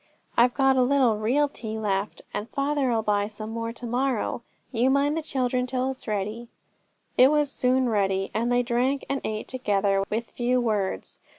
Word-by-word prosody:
I've 245 +1 +4
got 270 -1 +3
a - - +5
little 250 -4 +3
real 255 +8 +2
tea 220 -5 -6
left, 200 -1 -2
and 205 +2 -4
father 280 -2 0
'll 225 -1 +1
buy 205 -1 +1
some 215 +1 -8
more 230 0 -3
to 240 - -8
morrow. 245 -1 -1 0.3
You 250 +1 +2
mind 280 +2 +2
the 325 - -1
children 255 -4 -1
till 260 +1 -1
it's 260 - -10
ready.' 215 +3 -3 0.7
It 255 +2 +8
was 295 -1 +2
soon 255 0 +2
ready, 195 -3 0
and 235 +2 0
they 245 0 +3
drank 250 +3 0
and 275 -1 -2
ate 215 0 -3
together, 200 -5 +1
with 225 +2 -3
few 250 +1 +1
words. 210 - -2
240 Hz, 185 wpm, -26 LUFS, 215-265 Hz, 0.7 s, It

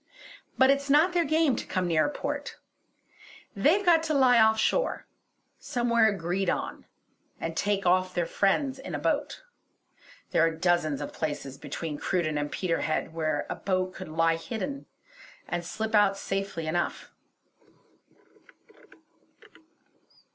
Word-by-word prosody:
But 260 +1 +6
it's 280 0 -1
not 310 +6 +4
their 345 -1 +3
game 310 -2 +2
to - - -4
come 185 -1 -1
near 165 -3 +2
a - - -1
port. 290 0 -4 1.0
They've 320 - +3
got 335 -2 +5
to 310 -2 0
lie 255 -3 +5
off 220 0 +4
shore, - - 0 0.5
somewhere 240 -4 +2
agreed 190 -1 -1
on, - - -3 0.5
and 165 0 -4
take 200 +2 0
off 185 +1 +3
their 175 -1 +1
friends 260 - 0
in 265 - -6
a - - -3
boat. - - -1 0.9
There - - +3
are 165 - +4
dozens 160 -3 0
of 145 - -6
places 140 -3 -4
between 155 -3 -5
Cruden 155 -5 -1
and 145 0 -3
Peterhead 165 -3 -1
where 155 -2 -1
a - - -3
boat 185 -1 -1
could 185 -4 -8
lie 165 +1 +2
hidden, 245 +10 -5 0.6
and 175 0 -3
slip 220 +5 -4
out 205 -2 +4
safely 195 -4 -3
enough. 175 +3 -2
195 Hz, 140 wpm, -27 LUFS, 165-265 Hz, 1.0 s, But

